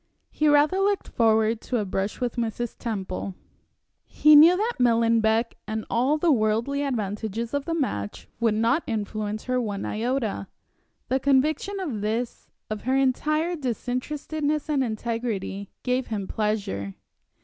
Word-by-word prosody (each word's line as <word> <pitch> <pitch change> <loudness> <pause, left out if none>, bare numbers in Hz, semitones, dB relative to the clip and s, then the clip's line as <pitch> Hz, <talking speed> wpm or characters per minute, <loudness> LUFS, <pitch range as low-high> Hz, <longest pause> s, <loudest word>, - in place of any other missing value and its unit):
He 305 - +1
rather 295 +5 +4
looked 400 0 +1
forward 220 -1 +2
to 250 - -2
a 210 - -1
brush 195 +2 -2
with 245 -2 -2
Mrs. 235 0 -2
Temple. 195 -4 -4 0.7
He 305 0 +6
knew 330 +5 +8
that 450 +4 -1
Millenbeck 230 -1 +3
and 220 0 -3
all 260 +6 +2
the 330 +1 +3
worldly 230 +4 +1
advantages 225 -3 -3
of 285 -1 -1
the 330 - -1
match 105 - -3
would 225 -2 +2
not 230 +8 +2
influence 215 -2 -3
her 255 0 0
one 205 -4 -3
iota. 225 -3 -2 0.6
The 265 - +2
conviction 290 +9 +1
of 275 - -3
this, 225 +3 -3 0.2
of 215 -1 -4
her 260 +1 +2
entire 305 +6 +1
disinterestedness 295 +3 -2
and 275 -3 +2
integrity, 220 -4 -3
gave 255 0 0
him 205 -4 -3
pleasure. 200 - -2
235 Hz, 140 wpm, -25 LUFS, 215-285 Hz, 0.7 s, knew